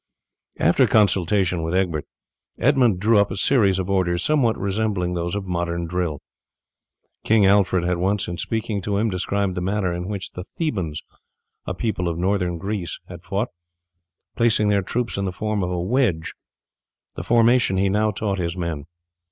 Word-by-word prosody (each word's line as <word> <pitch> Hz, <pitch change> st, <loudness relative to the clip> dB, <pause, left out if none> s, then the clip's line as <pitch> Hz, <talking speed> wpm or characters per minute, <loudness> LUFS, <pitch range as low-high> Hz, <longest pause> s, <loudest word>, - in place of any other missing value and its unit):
After -, -, +4 dB
consultation 95 Hz, -3 st, +2 dB
with 80 Hz, +2 st, -2 dB
Egbert, 85 Hz, -6 st, 0 dB, 0.5 s
Edmund 125 Hz, -7 st, +3 dB
drew 105 Hz, +2 st, +4 dB
up 100 Hz, -, +3 dB
a 95 Hz, -, -5 dB
series 100 Hz, -4 st, +3 dB
of 95 Hz, -1 st, -2 dB
orders 90 Hz, -3 st, +1 dB
somewhat 135 Hz, -7 st, +2 dB
resembling 100 Hz, -3 st, -1 dB
those 85 Hz, +1 st, -2 dB
of 100 Hz, -1 st, -3 dB
modern 85 Hz, -1 st, -2 dB
drill. 85 Hz, -4 st, -2 dB, 1.0 s
King 110 Hz, -2 st, +4 dB
Alfred 95 Hz, -2 st, +3 dB
had 90 Hz, 0 st, 0 dB
once, 95 Hz, +3 st, 0 dB
in 85 Hz, -1 st, -5 dB
speaking 110 Hz, 0 st, -2 dB
to 100 Hz, +2 st, -1 dB
him, 110 Hz, +1 st, +1 dB
described 95 Hz, +1 st, -1 dB
the 90 Hz, -, -3 dB
manner 95 Hz, -1 st, -1 dB
in 90 Hz, +1 st, -4 dB
which 100 Hz, -2 st, -4 dB
the 90 Hz, -, -7 dB
Thebans, 95 Hz, -, -3 dB, 0.6 s
a 95 Hz, -, -2 dB
people 100 Hz, -4 st, -2 dB
of 85 Hz, -1 st, -2 dB
Northern 90 Hz, -1 st, 0 dB
Greece, 95 Hz, -1 st, -4 dB
had 90 Hz, -1 st, -9 dB
fought, 100 Hz, +5 st, -2 dB, 0.9 s
placing 110 Hz, -3 st, +2 dB
their 100 Hz, -1 st, +3 dB
troops 115 Hz, +5 st, -2 dB
in 100 Hz, -, -1 dB
the 95 Hz, -, -1 dB
form 105 Hz, +2 st, -2 dB
of 90 Hz, -, -1 dB
a 90 Hz, -1 st, -2 dB
wedge. 95 Hz, -4 st, 0 dB, 0.8 s
The -, -, -4 dB
formation 115 Hz, -3 st, +3 dB
he 95 Hz, +1 st, +2 dB
now 105 Hz, +2 st, +2 dB
taught 100 Hz, -1 st, -2 dB
his 85 Hz, 0 st, -2 dB
men. 85 Hz, -5 st, -3 dB
95 Hz, 170 wpm, -22 LUFS, 90-105 Hz, 1.0 s, After